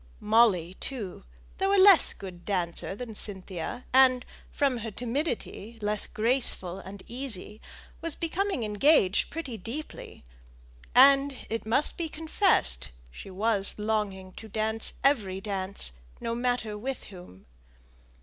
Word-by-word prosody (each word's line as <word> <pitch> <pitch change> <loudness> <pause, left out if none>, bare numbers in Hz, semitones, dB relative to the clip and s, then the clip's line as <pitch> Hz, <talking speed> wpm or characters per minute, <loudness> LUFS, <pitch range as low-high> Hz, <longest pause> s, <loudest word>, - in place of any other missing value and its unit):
Molly, 210 -6 +3
too, 205 -7 -5 0.3
though 385 +1 +2
not 385 -3 +8
so - - +2
good 190 -2 -8
a - - -14
dancer 180 0 -2
as 230 -4 -5
Cynthia, 190 +2 -3
and, 255 -1 +5 0.2
from 275 -3 0
her 225 0 -5
timidity, 235 - -4
less 210 0 -1
graceful 220 -6 +1
and 195 0 -10
easy, 225 -4 -6 0.4
was 330 -2 -1
becoming 355 - -2
engaged 210 -1 +3
pretty 280 -8 -5
deeply; 230 - -8 0.7
and, 275 +1 +6
it 225 -1 -3
must 260 +10 +2
be 330 -2 -2
confessed, 305 - +1 0.2
she 125 - -10
was 200 +1 +1
longing 210 -3 -2
to 220 - -10
dance 220 +1 -1
every 210 -9 +2
dance, 195 - -2 0.3
no 230 - -3
matter 240 -3 -1
with 255 +5 -5
whom. 180 - -13
220 Hz, 130 wpm, -28 LUFS, 195-265 Hz, 0.7 s, not